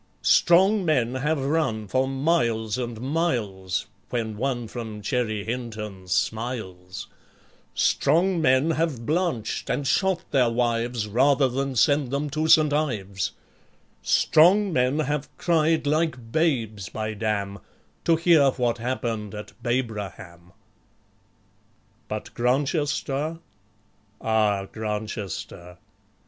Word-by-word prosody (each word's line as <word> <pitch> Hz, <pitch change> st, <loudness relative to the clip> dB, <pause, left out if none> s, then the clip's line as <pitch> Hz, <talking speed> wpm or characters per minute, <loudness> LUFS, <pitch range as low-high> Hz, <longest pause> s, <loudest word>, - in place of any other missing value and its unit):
Strong 190 Hz, +4 st, +5 dB
men 130 Hz, -8 st, +1 dB
have 140 Hz, +1 st, -1 dB
run 135 Hz, -8 st, 0 dB
for 130 Hz, +6 st, +1 dB
miles 125 Hz, -7 st, 0 dB
and 120 Hz, -3 st, -4 dB
miles, 115 Hz, -, -1 dB, 0.2 s
When 115 Hz, -3 st, -2 dB
one 120 Hz, 0 st, -2 dB
from 110 Hz, -2 st, -7 dB
Cherry 110 Hz, -3 st, -1 dB
Hinton 110 Hz, -5 st, -5 dB
smiles; 100 Hz, -3 st, -3 dB, 0.7 s
Strong 170 Hz, +4 st, +2 dB
men 135 Hz, +2 st, +3 dB
have 155 Hz, -7 st, -1 dB
blanched, 155 Hz, -, -1 dB
and 145 Hz, -, -1 dB
shot 190 Hz, +5 st, +1 dB
their 130 Hz, -4 st, +3 dB
wives, 120 Hz, -1 st, 0 dB
Rather 135 Hz, +5 st, +3 dB
than 135 Hz, +1 st, -2 dB
send 140 Hz, +2 st, +3 dB
them 140 Hz, +2 st, -2 dB
to 155 Hz, +2 st, -1 dB
St. 155 Hz, -2 st, +5 dB
Ives; 105 Hz, -11 st, -1 dB, 0.7 s
Strong 190 Hz, +5 st, +4 dB
men 125 Hz, +2 st, +2 dB
have 150 Hz, -1 st, -2 dB
cried 160 Hz, -2 st, +2 dB
like 145 Hz, -6 st, -1 dB
babes, 115 Hz, -, 0 dB
bydam, 105 Hz, -2 st, -3 dB, 0.5 s
To 165 Hz, -, +5 dB
hear 160 Hz, -4 st, +5 dB
what 120 Hz, -2 st, -1 dB
happened 115 Hz, -4 st, -3 dB
at 105 Hz, -1 st, -8 dB
Babraham. 105 Hz, -8 st, -4 dB, 1.6 s
But -, -, -6 dB
Grantchester! 145 Hz, +4 st, 0 dB, 0.8 s
ah, 105 Hz, -3 st, +1 dB
Grantchester! 105 Hz, -5 st, -5 dB
125 Hz, 105 wpm, -25 LUFS, 110-150 Hz, 1.6 s, Strong